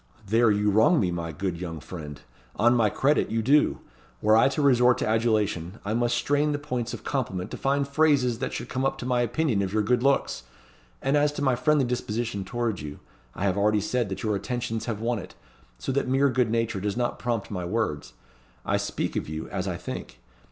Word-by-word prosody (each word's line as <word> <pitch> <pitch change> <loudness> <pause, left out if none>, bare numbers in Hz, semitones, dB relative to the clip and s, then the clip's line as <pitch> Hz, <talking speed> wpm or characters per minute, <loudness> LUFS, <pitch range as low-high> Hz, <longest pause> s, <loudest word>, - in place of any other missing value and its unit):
"There 115 +3 +3
you 105 0 +2
wrong 110 - +4
me, 90 -3 +1
my 85 -1 -3
good 85 +1 -3
young 80 -3 -5
friend 75 -2 -8 0.4
on 120 +3 +4
my 115 -3 +3
credit, 140 +8 +1
you 115 0 -1
do. 145 +5 +3 0.4
Were 110 +1 +4
I 115 +3 +6
to 140 - -3
resort 125 -2 +5
to - - -1
adulation, 110 -5 0
I 105 - -1
must 120 +1 +1
strain 145 +4 +1
the - - 0
points 125 -4 -3
of - - -11
compliment 105 -8 -3
to - - -5
find 140 +1 0
phrases 140 -5 +2
that 130 - -2
should - - -5
come 130 - -2
up 135 - 0
to - - -6
my 125 -1 +1
opinion 120 -2 +1
of 95 -1 -2
your 105 +1 +1
good 120 +3 +2
looks; 140 - +1 0.6
and 135 +2 +2
as 145 0 +3
to 145 - -3
my 130 -3 +3
friendly 140 +2 +2
disposition 115 -4 -2
towards 115 -1 -2
you, 75 -1 -7 0.4
I - - -4
have 100 0 +1
already 105 +1 +3
said 110 +2 -1
that 95 - -5
your 105 -2 +1
attentions 115 +1 -3
have 110 -3 -3
won 120 -1 0
it, 90 - -10 0.4
so - - -3
that 140 0 0
mere 135 +2 +3
good 125 -2 +1
nature 115 -3 0
does 100 +3 -2
not 120 -1 -1
prompt 115 -4 -2
my 90 -3 -3
words. 90 -5 -2 0.5
I - - +1
speak - - -3
of - - -2
you, 80 0 -5
as - - -3
I - - -2
think. 65 0 -7
115 Hz, 220 wpm, -26 LUFS, 100-130 Hz, 0.6 s, I